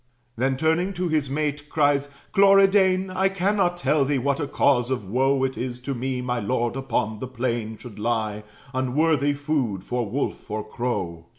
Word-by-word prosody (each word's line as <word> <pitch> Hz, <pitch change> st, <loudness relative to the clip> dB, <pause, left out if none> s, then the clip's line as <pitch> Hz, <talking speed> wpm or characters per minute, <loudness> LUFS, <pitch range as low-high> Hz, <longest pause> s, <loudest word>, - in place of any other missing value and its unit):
Then, 130 Hz, +3 st, 0 dB
turning 160 Hz, +6 st, +1 dB
to 180 Hz, -1 st, -2 dB
his 150 Hz, -4 st, 0 dB
mate, 150 Hz, +1 st, -2 dB
cries, 145 Hz, -2 st, +2 dB, 0.2 s
"Cloridane, 195 Hz, -1 st, +5 dB
I 190 Hz, +1 st, +2 dB
cannot 195 Hz, -1 st, +1 dB
tell 150 Hz, -3 st, +2 dB
thee 140 Hz, +1 st, +1 dB
what 140 Hz, +3 st, 0 dB
a 145 Hz, -, -2 dB
cause 125 Hz, -4 st, +2 dB
of 125 Hz, -6 st, -2 dB
woe 135 Hz, +5 st, +2 dB
It 130 Hz, 0 st, -2 dB
is 125 Hz, 0 st, -4 dB
to 140 Hz, +2 st, -3 dB
me, 130 Hz, 0 st, -2 dB
my 125 Hz, -1 st, -1 dB
lord 120 Hz, +2 st, -1 dB
upon 115 Hz, -5 st, -2 dB
the 130 Hz, -, -4 dB
plain 120 Hz, -3 st, -3 dB
Should 110 Hz, -2 st, -11 dB
lie, 110 Hz, -2 st, -1 dB, 0.3 s
unworthy 145 Hz, +3 st, +2 dB
food 140 Hz, -10 st, -1 dB
for 120 Hz, -2 st, -2 dB
wolf 135 Hz, +6 st, -3 dB
or 105 Hz, 0 st, -4 dB
crow! 90 Hz, -9 st, -3 dB
135 Hz, 175 wpm, -24 LUFS, 120-155 Hz, 0.3 s, Cloridane